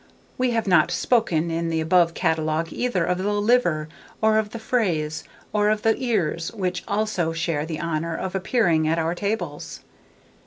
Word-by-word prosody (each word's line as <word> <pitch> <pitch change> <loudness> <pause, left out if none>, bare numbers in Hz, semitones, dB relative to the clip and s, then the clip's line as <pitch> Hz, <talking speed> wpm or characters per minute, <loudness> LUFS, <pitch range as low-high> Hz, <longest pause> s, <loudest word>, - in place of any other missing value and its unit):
We 255 0 +1
have 230 -2 0
not 180 -3 +4
spoken, 175 -4 +1
in 165 0 -1
the 165 -1 0
above 170 +1 +3
catalogue, 160 -1 0
either 245 -9 0
of 180 0 0
the 200 +2 0
liver, 205 -8 +2 0.3
or 220 0 +3
of 215 -1 -2
the 230 - -7
fraise, 175 -10 -1 0.3
or 210 0 +3
of 215 0 0
the 225 0 +3
ears, 170 -9 0
which 180 -2 -2
also 200 -6 0
share 165 -2 -2
the 160 -2 -4
honour 165 +1 -2
of 185 -1 -4
appearing 180 -5 +1
at 165 +1 +1
our 165 +1 0
tables. 175 -6 -4
180 Hz, 170 wpm, -23 LUFS, 165-215 Hz, 0.3 s, not